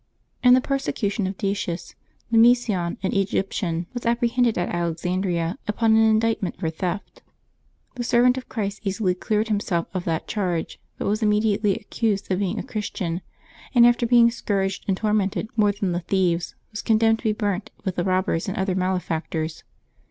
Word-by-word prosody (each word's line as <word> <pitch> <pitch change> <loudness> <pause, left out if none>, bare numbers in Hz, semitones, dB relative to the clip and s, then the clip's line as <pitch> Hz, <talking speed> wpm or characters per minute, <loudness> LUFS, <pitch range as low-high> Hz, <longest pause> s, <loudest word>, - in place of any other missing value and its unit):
IN 250 0 +8
the 255 - +3
persecution 220 -7 -1
of 190 0 -5
Decius, 195 -3 -3 0.4
Nemesion, 225 -7 +3
an 190 - 0
Egyptian, 190 -3 -1
was 245 - -5
apprehended 235 0 +1
at 175 +1 -1
Alexandria 175 - -1
upon 220 +1 +3
an 225 - +5
indictment 220 -3 +2
for 160 - -1
theft. 180 +4 -4 0.7
The 245 - -4
servant 245 +1 +4
of 260 - -7
Christ 200 -3 -3
easily 195 -2 0
cleared 215 +4 -1
himself 195 -5 0
of 185 -2 -2
that 165 -1 -2
charge, 180 -6 -2 0.2
but - - -4
was 210 +3 0
immediately 210 -1 +2
accused 205 -2 -2
of 185 - +1
being 200 +1 -1
a - - -3
Chris 215 -5 -4
tian, 170 -1 -3 0.5
and 235 -1 +8
after 240 0 +4
being 235 -1 +6
scourged 195 -4 -2
and 190 -2 +1
tormented 210 0 0
more 210 -2 +4
than 200 -2 -2
the 175 - 0
thieves, 175 -1 0 0.2
was 210 - -5
condemned 225 0 +3
to - - -14
be 220 - +3
burnt 205 0 -2 0.2
with 190 -2 -1
the 175 - 0
robbers 185 -3 0
and 195 - -3
other 190 0 0
malefactors. 165 -3 -2
200 Hz, 170 wpm, -24 LUFS, 180-225 Hz, 0.7 s, IN